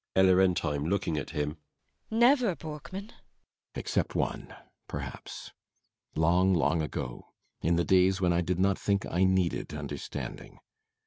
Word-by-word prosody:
ELLA 95 0 +6
RENTHEIM. 90 -6 +2
[Looking 90 -2 0
at 70 - -6
him.] 75 +1 -2 0.5
Never, 235 -3 +4
Borkman? 170 +7 -7
BORKMAN. - - -15 0.6
Except - - -1
one - - -2 0.4
perhaps. - - -7 0.6
Long, 90 +4 +3
long 80 0 +2
ago. 60 -5 -5 0.3
In 85 +2 +2
the 85 - +1
days 95 +1 +4
when 90 -2 +2
I 85 - +2
did 90 +1 -1
not 95 +1 +2
think 100 -1 0
I 90 +2 +1
needed 95 -2 0
understanding. - - -6
90 Hz, 135 wpm, -29 LUFS, 85-100 Hz, 0.6 s, ELLA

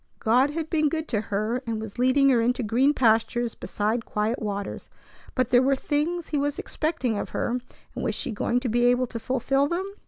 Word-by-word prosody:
God 245 +5 +3
had 315 +1 -3
been 310 -2 +2
good 315 +1 -3
to 215 -4 0
her, 215 +4 -2
and 225 -1 -2
was 220 +1 -8
leading 265 +2 +4
her 245 -3 +4
into 245 +2 +1
green 245 +6 +3
pastures 235 -2 +2
beside 220 +3 -2
quiet 215 +4 -1
waters; 205 -2 -4 0.5
but 255 -2 +1
there 245 0 +5
were 270 +1 +3
things 310 +5 -2
He 295 - 0
was 290 0 -1
expecting 270 -9 -2
of - - -4
her, 245 +1 -1 0.3
and - - -5
was - - -1
she - - -3
going 235 +3 0
to 255 - -2
be 240 +1 +2
able 245 +1 +3
to 235 -1 -6
fulfil 265 +3 +1
them? 345 +4 -2
250 Hz, 210 wpm, -25 LUFS, 225-285 Hz, 0.5 s, there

